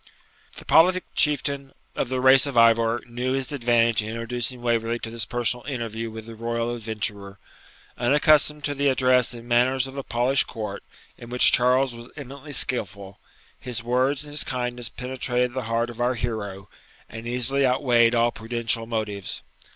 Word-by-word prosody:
The - - -10
politic 180 +3 +4
Chieftain 140 -2 +1 0.2
of 120 - -2
the 130 0 -1
race 130 +2 +5
of 135 -4 -4
Ivor 115 0 +4
knew 125 +2 -3
his 135 0 -2
advantage 115 -4 +2
in 105 - -6
introducing 120 +2 -3
Waverley 115 -1 0
to 115 -1 -7
this 115 -1 -1
personal 120 0 0
interview 115 -4 -4
with 110 0 -9
the 115 - -9
royal 115 +1 -3
adventurer. 105 -3 -4 0.6
Unaccustomed 150 +3 +3
to 145 - -1
the 140 0 0
address 125 -2 +3
and 120 0 -11
manners 125 +2 +2
of 135 +1 -9
a - - -2
polished 125 +2 +1
court, 105 -3 -6 0.4
in 120 - -11
which 125 0 +5
Charles 125 +1 +3
was 120 +1 -10
eminently 140 +1 -9
skilful, 100 -6 -3 0.4
his 120 -2 -4
words 130 +4 0
and 150 - -10
his 150 - +3
kindness 125 -2 -3
penetrated 125 -1 -2
the 130 -2 -4
heart 115 +1 0
of 120 +1 -8
our 125 +1 +1
hero, 105 -4 -5 0.4
and 115 +1 -8
easily 125 +3 0
outweighed 125 -3 +3
all 120 0 +3
prudential 115 0 -2
motives. 105 -4 -4
120 Hz, 165 wpm, -24 LUFS, 115-130 Hz, 0.6 s, race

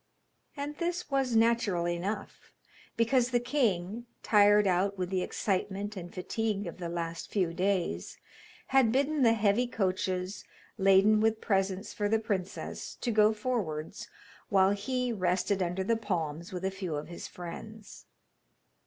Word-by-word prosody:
And 290 +1 -4
this 345 -2 -3
was 265 -3 +1
natural 225 -6 +2
enough, 175 +5 -4 0.5
because 240 +2 +3
the 245 -1 +2
king, 235 -4 -1 0.2
tired 205 -1 +5
out 195 +2 +1
with 180 0 -3
the 185 -1 +1
excitement 200 +2 -2
and 175 -2 -7
fatigue 205 +2 -2
of 170 +1 -7
the 170 -2 -4
last 170 -1 -4
few 180 -5 0
days, 180 - -1 0.5
had 265 -4 +4
bidden 280 +4 +1
the 230 -3 +6
heavy 215 +3 +2
coaches, 185 -3 -2 0.4
laden 195 +2 +5
with 220 0 +2
presents 195 -1 -1
for 205 -2 -1
the 225 - +3
princess, 200 -4 -4
to 240 - 0
go 215 -1 +5
forwards, 210 -9 -3 0.4
while 190 -1 +4
he 250 +4 -1
rested 185 0 0
under 180 +1 -1
the 230 +4 +2
palms 170 -6 -3
with 185 0 -4
a 190 - 0
few 190 -5 -4
of 145 - -4
his 170 - -7
friends. 205 +5 -9
200 Hz, 145 wpm, -30 LUFS, 180-225 Hz, 0.5 s, the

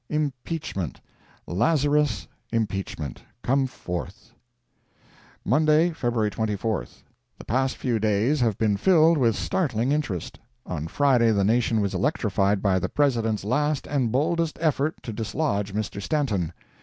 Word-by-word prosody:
IMPEACHMENT 145 - -3 0.5
LAZARUS 145 - +1 0.2
IMPEACHMENT, 95 - -3 0.2
COME 135 +1 +2
FORTH! 100 -1 -7 1.1
Monday, 155 +6 +4
Feb. 120 -8 -1
24. 110 -1 -2 0.5
The - - -12
past 130 +3 0
few 120 -4 0
days 110 +7 +2
have 115 -5 +1
been 105 -3 +1
filled 165 - +5
with 115 -4 +3
startling 130 - 0
interest. 115 - -2 0.3
On 80 -3 -4
Friday 125 - +3
the 100 -2 +2
nation 115 +1 +2
was 100 -1 -1
electrified 100 -8 +1
by 95 -2 +3
the - - -2
President's 115 -8 +1
last 145 +5 0
and 130 -6 0
boldest 160 +5 0
effort 155 -1 +1
to 115 - -5
dislodge 110 -2 -1
Mr. 105 -1 -3
Stanton. 105 - 0
115 Hz, 125 wpm, -25 LUFS, 105-145 Hz, 1.1 s, filled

